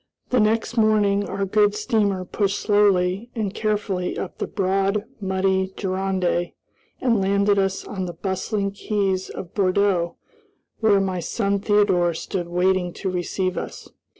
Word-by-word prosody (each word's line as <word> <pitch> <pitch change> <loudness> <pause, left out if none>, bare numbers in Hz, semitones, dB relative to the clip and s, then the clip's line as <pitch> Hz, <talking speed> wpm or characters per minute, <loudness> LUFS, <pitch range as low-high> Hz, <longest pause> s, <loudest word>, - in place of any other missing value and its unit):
The 250 - +3
next 225 +2 +1
morning 205 -2 +3
our 195 0 -1
good 205 +1 +3
steamer 210 -4 0
pushed 200 +1 -1
slowly 200 0 +2
and 210 -4 -2
carefully 205 -4 -1
up 185 - -6
the - - -2
broad, 195 +1 0 0.2
muddy 190 0 0
Gironde 185 -2 -1 0.5
and 230 -5 +2
landed 200 +1 +2
us 195 0 -1
on 190 -3 -4
the 175 - -5
bustling 200 +2 -2
quays 195 -2 -1
of 180 - -8
Bordeaux, 185 -3 +1 0.6
where 215 -3 +4
my 190 -2 -1
son 200 +3 -1
Theodore 195 -5 +2
stood 175 +1 -4
waiting 180 0 +1
to 190 - -3
receive 185 +1 -1
us. - - -8
195 Hz, 140 wpm, -23 LUFS, 185-205 Hz, 0.6 s, where